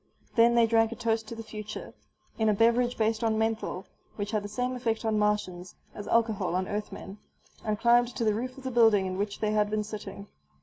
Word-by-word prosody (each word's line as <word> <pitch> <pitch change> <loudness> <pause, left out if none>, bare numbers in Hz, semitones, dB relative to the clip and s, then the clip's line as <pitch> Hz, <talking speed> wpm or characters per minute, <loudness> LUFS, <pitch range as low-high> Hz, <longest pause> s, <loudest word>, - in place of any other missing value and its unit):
Then 235 0 +5
they 235 -1 +6
drank 225 0 +3
a - - -5
toast 225 -2 -1
to 230 - -7
the 225 - -7
future 215 -1 -8 0.5
in 220 -1 +3
a 210 - +3
beverage 235 +3 +3
based 220 0 0
on 220 -1 +1
menthol, 220 -4 -2 0.3
which 205 0 -4
had 215 -2 0
the - - -4
same 250 +4 -2
effect 230 -2 -2
on 215 -1 +1
Martians 195 -4 -1 0.2
as 205 -1 -8
alcohol 225 -6 +1
on 185 0 -1
Earthmen 205 -1 -6 0.4
and 215 -1 -1
climbed 240 +2 +4
to 240 - -1
the 215 -2 +3
roof 255 +4 -4
of 270 - -11
the 260 - -3
building 225 -5 +5
in 185 0 -3
which 205 0 -3
they 215 -1 +1
had 210 -1 +2
been 215 0 -1
sitting. 205 -2 -8
220 Hz, 220 wpm, -28 LUFS, 210-230 Hz, 0.5 s, they